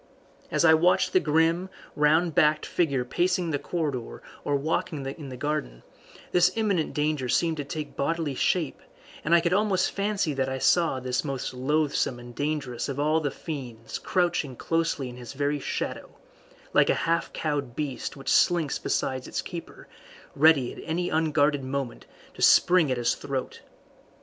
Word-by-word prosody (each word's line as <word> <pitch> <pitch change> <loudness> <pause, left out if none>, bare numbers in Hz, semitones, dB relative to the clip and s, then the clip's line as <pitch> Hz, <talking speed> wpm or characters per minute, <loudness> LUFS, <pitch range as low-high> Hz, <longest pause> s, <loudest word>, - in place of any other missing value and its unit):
As - - +2
I 160 - +8
watched 175 +3 +3
the 185 - +6
grim, 165 +3 +1 0.3
round 155 +3 +3
backed 155 +1 +3
figure 140 -8 0
pacing 175 +4 0
the 145 - -1
corridor 145 -9 -4 0.2
or 145 - 0
walking 145 0 -2
in 135 +1 -6
the 130 - -7
garden, 125 - -3 0.5
this 180 0 +4
imminent 200 -8 0
danger 150 -4 0
seemed 165 +2 +1
to 145 - -2
take 150 +1 -6
bodily 160 0 -1
shape, 160 +3 0 0.4
and 165 +3 +4
I 170 - +5
could 170 +1 +1
almost 200 -2 +2
fancy 200 -6 -1
that 135 -1 -1
I 130 - -2
saw 165 0 +2
this 130 0 -1
most 135 -4 -4
loathsome 140 0 0
and 120 0 -11
dangerous 145 -3 -3
of 140 0 -4
all 155 +2 +2
the 150 -2 -1
fiends 125 -7 -7
crouching 175 -7 0
closely 165 -2 -1
in 125 0 -9
his 120 +1 -9
very 145 +1 -1
shadow, - - -4 0.6
like - - +4
a - - +4
half 165 0 0
cowed 145 -6 -3
beast 145 -2 -4
which 135 0 -12
slinks 170 -5 +3
beside 130 -1 -2
its - - -3
keeper, 170 -2 -9 0.5
ready 145 -4 +4
at - - -10
any 175 +2 -2
unguarded 150 -3 +2
moment 130 -2 -4 0.3
to - - -11
spring 175 -4 +5
at 130 - 0
his 120 -1 +1
throat. 135 -2 -5
150 Hz, 165 wpm, -26 LUFS, 135-165 Hz, 0.6 s, I